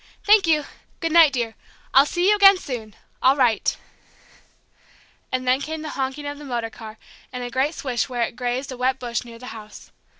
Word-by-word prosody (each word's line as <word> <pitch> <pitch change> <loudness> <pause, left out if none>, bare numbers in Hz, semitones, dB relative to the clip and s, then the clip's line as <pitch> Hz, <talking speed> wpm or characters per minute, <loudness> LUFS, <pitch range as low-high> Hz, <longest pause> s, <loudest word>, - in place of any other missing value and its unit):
Thank 410 -3 +5
you! 305 -3 +2 0.3
Good 330 -2 -2
night, 325 -3 +7
dear! 235 -3 -2 0.4
I'll 275 +2 +6
see 350 +3 0
you 420 - +5
again 395 -1 +7
soon 235 - -7 0.3
I'll 265 +2 +5
write." 245 -5 +1 1.5
And 255 0 -2
then 255 +2 +3
came 315 +1 -5
the 310 - -5
honking 270 +2 -4
of 285 0 -5
the - - -10
motor 240 -4 -3
car, 220 -1 -11 0.3
and 250 -1 -5
a 245 - -6
great 275 +6 0
swish 255 -1 -2
where 245 -2 -1
it 230 - -4
grazed 250 +2 -3
a 255 - -7
wet 255 +1 0
bush 240 -2 -3
near 235 -1 -12
the 250 - -12
house. 215 -1 -12
260 Hz, 200 wpm, -22 LUFS, 240-300 Hz, 1.5 s, night